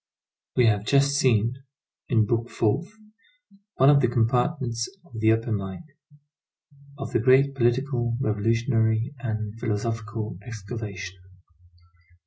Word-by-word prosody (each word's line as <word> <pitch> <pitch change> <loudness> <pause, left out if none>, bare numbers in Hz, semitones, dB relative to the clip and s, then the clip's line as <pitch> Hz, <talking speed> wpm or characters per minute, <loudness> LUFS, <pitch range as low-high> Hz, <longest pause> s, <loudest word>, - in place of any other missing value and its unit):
We 125 - +4
have 105 -3 +2
just 140 +4 +3
seen, 125 -2 +2 0.5
in 110 -4 +3
Book 115 +2 -1
Fourth, 135 - 0 0.8
one 135 +2 +6
of 140 -1 +5
the 125 - +3
compartments 120 +1 0 0.2
of 120 -10 -9
the 110 0 +4
upper 115 +1 0
mine, 100 - -4 1.1
of - - -6
the - - +3
great 135 +4 +4
political, 120 -1 0
revolutionary, 115 +2 +1
and 110 -3 -4
philosophical 110 -2 -3
excavation. 100 -4 -7
115 Hz, 115 wpm, -25 LUFS, 110-130 Hz, 1.1 s, one